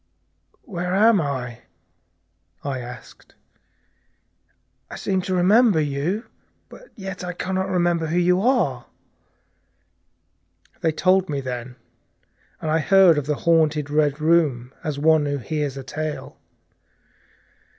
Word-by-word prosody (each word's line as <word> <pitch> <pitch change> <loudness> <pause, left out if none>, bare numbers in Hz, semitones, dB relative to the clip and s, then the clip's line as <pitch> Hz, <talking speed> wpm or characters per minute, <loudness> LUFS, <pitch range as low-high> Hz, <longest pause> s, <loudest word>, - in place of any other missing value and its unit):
"Where 180 - -3
am 215 -1 +5
I?" 125 -5 -4 1.0
I 140 -2 -3 0.2
said. - - -20 1.5
"I - - -8
seem 190 -1 -1
to 185 +1 -2
remember 200 +1 +4
you, 150 - -2 0.5
and - - -14
yet 190 -4 -7
I 180 0 -4
can 185 +2 -4
not 190 +1 -1
remember 175 -3 +1
who 165 +3 -1
you 180 +1 +3
are." 205 - +1 1.9
They 160 - +1
told 185 +3 +2
me 145 -2 -2
then, 125 -1 -6 0.8
and 155 - -3
I 160 - +2
heard 180 -1 +5
of 145 - -7
the 150 - 0
haunted 155 -3 +2
Red 150 -1 +1
Room 150 -6 +1
as 150 -2 -3
one 155 0 +3
who 145 0 -1
hears 145 +1 -3
a 135 - -6
tale. 150 +3 -6
160 Hz, 125 wpm, -22 LUFS, 145-185 Hz, 1.9 s, am